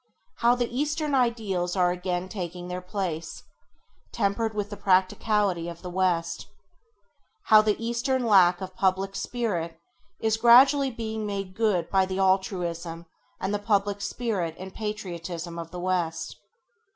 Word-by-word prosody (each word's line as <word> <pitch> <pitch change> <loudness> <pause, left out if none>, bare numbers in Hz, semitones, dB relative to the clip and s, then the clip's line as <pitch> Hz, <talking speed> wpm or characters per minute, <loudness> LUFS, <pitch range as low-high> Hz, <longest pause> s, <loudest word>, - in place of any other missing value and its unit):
How 240 +1 +4
the 245 -1 0
eastern 300 +2 -1
ideals 215 -8 0
are 180 -2 +3
again 180 0 -2
taking 180 -2 -6
their 180 0 -4
place, 180 -4 -4 0.7
tempered 215 +2 -1
with 205 0 -3
the - - -4
practicality 190 -1 +1
of 170 +1 -10
the 180 - -6
West. 170 -2 0 1.0
How 215 -1 +9
the 215 -1 +1
eastern 240 +2 -1
lack 185 -4 +5
of 185 0 -6
public 195 +1 0
spirit 175 -9 -3 0.4
is 220 0 +1
gradually 265 +4 +6
being 220 -3 -4
made 195 -2 -4
good 210 -6 +1
by 190 -1 +3
the 190 0 -3
altruism 175 -3 -1 0.3
and 195 +2 -2
the 205 - 0
public 205 -1 0
spirit 195 -6 -2
and 190 +1 -8
the - - -28
patriotism 175 -5 -5
of 165 -1 -6
the 180 - -7
West. 175 -2 -2
190 Hz, 145 wpm, -26 LUFS, 180-220 Hz, 1.0 s, How